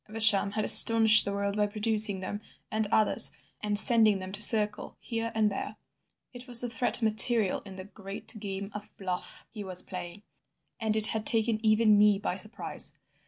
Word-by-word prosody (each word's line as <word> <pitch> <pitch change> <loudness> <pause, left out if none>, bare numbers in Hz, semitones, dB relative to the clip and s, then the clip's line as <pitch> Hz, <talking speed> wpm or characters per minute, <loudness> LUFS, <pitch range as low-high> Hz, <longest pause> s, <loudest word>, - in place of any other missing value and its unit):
Evesham 210 -2 +4
had 215 0 -3
astonished 225 -1 +7
the 200 - -4
world 200 0 -4
by 210 0 -1
producing 210 -2 +1
them 205 +2 -7 0.3
and 220 0 -3
others, 215 - +4 0.3
and 210 -1 -3
sending 220 -1 +2
them 185 0 -9
to 200 +2 -3
circle 210 -1 +2
here 230 -1 -6
and 215 -1 0
there. 205 +2 -7 0.6
It 245 +1 -11
was 240 -2 +2
the 245 - -4
threat 240 0 0
material 220 -1 +1
in 190 - -12
the 185 - -10
great 200 +1 -8
game 200 0 -8
of 210 0 -10
bluff 185 -2 -7
he 210 -2 -9
was 185 -1 -5
playing, 180 +1 -10 0.6
and 220 -1 -2
it 220 -1 +3
had 220 -1 -2
taken 225 0 -1
even 215 -1 +2
me 210 -1 +3
by 200 -3 -5
surprise. 215 +4 -8
210 Hz, 180 wpm, -27 LUFS, 200-220 Hz, 0.6 s, astonished